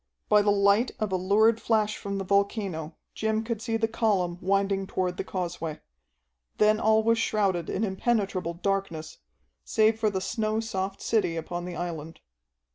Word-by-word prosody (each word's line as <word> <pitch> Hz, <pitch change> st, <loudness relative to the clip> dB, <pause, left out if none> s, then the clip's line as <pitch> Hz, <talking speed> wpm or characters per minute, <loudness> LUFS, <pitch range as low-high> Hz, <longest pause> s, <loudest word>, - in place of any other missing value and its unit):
By 210 Hz, -, +6 dB
the 205 Hz, -, +2 dB
light 200 Hz, +4 st, +3 dB
of 215 Hz, -2 st, -1 dB
a -, -, +1 dB
lurid 215 Hz, +5 st, +3 dB
flash 215 Hz, -2 st, +1 dB
from 200 Hz, 0 st, -4 dB
the 195 Hz, -, -2 dB
volcano 195 Hz, -4 st, -1 dB, 0.2 s
Jim 220 Hz, 0 st, -1 dB
could 225 Hz, -2 st, -3 dB
see 225 Hz, -1 st, -1 dB
the 225 Hz, 0 st, +1 dB
column 195 Hz, -6 st, 0 dB
winding 195 Hz, 0 st, +1 dB
toward 180 Hz, -2 st, -2 dB
the -, -, -2 dB
causeway. 170 Hz, -4 st, -4 dB, 0.8 s
Then 215 Hz, 0 st, +4 dB
all 220 Hz, 0 st, +3 dB
was 230 Hz, +1 st, +3 dB
shrouded 195 Hz, -7 st, 0 dB
in 210 Hz, -, -1 dB
impenetrable 190 Hz, -4 st, -1 dB
darkness, 185 Hz, -4 st, -3 dB, 0.4 s
save 220 Hz, 0 st, +2 dB
for 220 Hz, -1 st, +2 dB
the 190 Hz, -2 st, -2 dB
snow 215 Hz, +2 st, -1 dB
soft 195 Hz, -3 st, -3 dB
city 210 Hz, -7 st, +1 dB
upon 175 Hz, +2 st, -4 dB
the 180 Hz, -1 st, -6 dB
island. 165 Hz, -2 st, -5 dB
200 Hz, 165 wpm, -27 LUFS, 180-220 Hz, 0.8 s, By